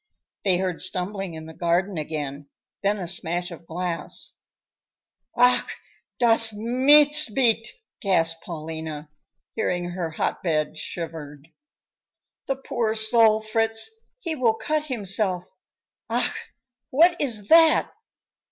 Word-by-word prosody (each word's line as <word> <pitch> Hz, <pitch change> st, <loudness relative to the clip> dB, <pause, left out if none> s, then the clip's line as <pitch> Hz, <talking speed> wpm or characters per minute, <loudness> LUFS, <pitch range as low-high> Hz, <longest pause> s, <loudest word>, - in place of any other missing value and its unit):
They 185 Hz, -3 st, +2 dB
heard 185 Hz, -2 st, -2 dB
stumbling 185 Hz, -1 st, -1 dB
in 160 Hz, 0 st, -8 dB
the 160 Hz, -, -10 dB
garden 175 Hz, +4 st, 0 dB
again, 145 Hz, -2 st, -5 dB, 0.3 s
then 205 Hz, +1 st, +1 dB
a 180 Hz, -3 st, -5 dB
smash 175 Hz, +1 st, -1 dB
of 170 Hz, 0 st, -12 dB
glass. 175 Hz, 0 st, -1 dB, 1.0 s
"Ach, 245 Hz, +1 st, +3 dB, 0.5 s
das 230 Hz, -2 st, +6 dB
Mistbeet!" 255 Hz, 0 st, +3 dB, 0.3 s
gasped 165 Hz, -6 st, 0 dB
Paulina, 160 Hz, -2 st, -7 dB, 0.4 s
hearing 175 Hz, -5 st, -2 dB
her 175 Hz, -2 st, -3 dB
hotbed 155 Hz, -1 st, -2 dB
shivered. 155 Hz, -3 st, -7 dB, 1.0 s
"The 270 Hz, -, 0 dB
poor 235 Hz, -4 st, -2 dB
soul, 220 Hz, 0 st, +4 dB
Fritz, 225 Hz, -, 0 dB, 0.3 s
he 335 Hz, -9 st, -3 dB
will 235 Hz, -5 st, +2 dB
cut 305 Hz, +5 st, -2 dB
himself. 200 Hz, -7 st, -1 dB, 0.7 s
Ach! -, -, -2 dB, 0.4 s
what 340 Hz, +6 st, +4 dB
is 220 Hz, -8 st, -2 dB
that?" 325 Hz, -1 st, +5 dB
195 Hz, 105 wpm, -24 LUFS, 165-230 Hz, 1.0 s, das